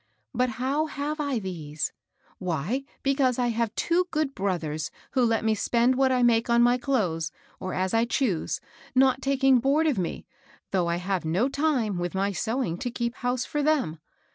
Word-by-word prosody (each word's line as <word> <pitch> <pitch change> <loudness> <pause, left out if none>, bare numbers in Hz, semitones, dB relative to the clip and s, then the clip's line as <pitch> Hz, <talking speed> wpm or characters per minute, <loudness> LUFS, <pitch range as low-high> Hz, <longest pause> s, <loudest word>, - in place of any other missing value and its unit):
But 250 +1 +1
how 275 +5 0
have 300 +1 -3
I 285 -4 0
these? 160 -7 -4 0.5
Why, 185 - -2 0.2
because 270 -3 +2
I 245 -1 +1
have 230 -1 -1
two 355 +2 +1
good 305 -4 -1
brothers 165 - -2 0.2
who 260 -2 +2
let 225 -1 +1
me 220 - +3
spend 235 +4 +2
what 265 0 +3
I 250 -1 +2
make 235 0 +3
on 235 0 +5
my 245 +1 +4
clothes, 180 - 0 0.3
or 185 0 -4
as 185 0 -1
I 225 +1 +3
choose, 235 - 0 0.4
not 260 0 +4
taking 270 -1 +4
board 280 +6 +2
of 285 -10 +2
me, 175 - -3 0.5
though 180 -3 +1
I 170 - +1
have 180 +1 -2
no 175 +10 +1
time, 270 - 0
with 175 +1 -3
my 195 +1 +1
sewing, 195 - -2
to 245 - -2
keep 235 0 -2
house 245 0 -1
for 295 - -2
them. 280 - +1
235 Hz, 185 wpm, -26 LUFS, 185-270 Hz, 0.5 s, on